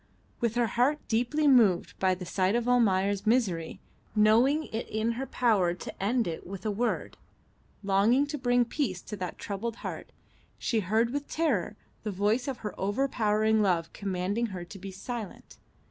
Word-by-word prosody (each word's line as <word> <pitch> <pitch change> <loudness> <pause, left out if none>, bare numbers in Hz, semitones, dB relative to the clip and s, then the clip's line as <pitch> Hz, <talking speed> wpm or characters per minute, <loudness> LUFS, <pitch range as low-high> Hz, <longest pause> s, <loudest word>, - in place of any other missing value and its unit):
With 235 -2 0
her 240 0 +3
heart 250 +7 +2
deeply 250 +7 +1
moved 225 -10 +4
by 185 -1 +2
the 180 0 -8
sight 185 +3 +1
of 240 0 0
Almayer's 200 -4 +2
misery, 195 -9 +1 0.4
knowing 235 +8 +4
it 225 - -3
in 220 +2 0
her 260 +3 -4
power 200 -8 +2
to 185 - -8
end 230 +2 +1
it 165 0 -5
with 195 +1 -8
a 215 - +1
word, 235 +4 -2 0.7
longing 205 +8 +3
to 295 +1 -4
bring 245 -1 +3
peace 230 - -2
to 210 - -6
that 180 -2 -5
troubled 215 +3 -4
heart, - - -6 0.5
she 230 - 0
heard 220 +4 +1
with 285 +1 -3
terror 325 0 0 0.3
the 215 - -4
voice 210 +7 0
of 270 -3 -3
her 210 - -3
overpowering 215 -1 +1
love 175 -5 +1
commanding 200 +4 -2
her 185 -4 -6
to 195 +3 -11
be 195 +1 -7
silent. 210 +2 -7
215 Hz, 170 wpm, -29 LUFS, 195-245 Hz, 0.7 s, moved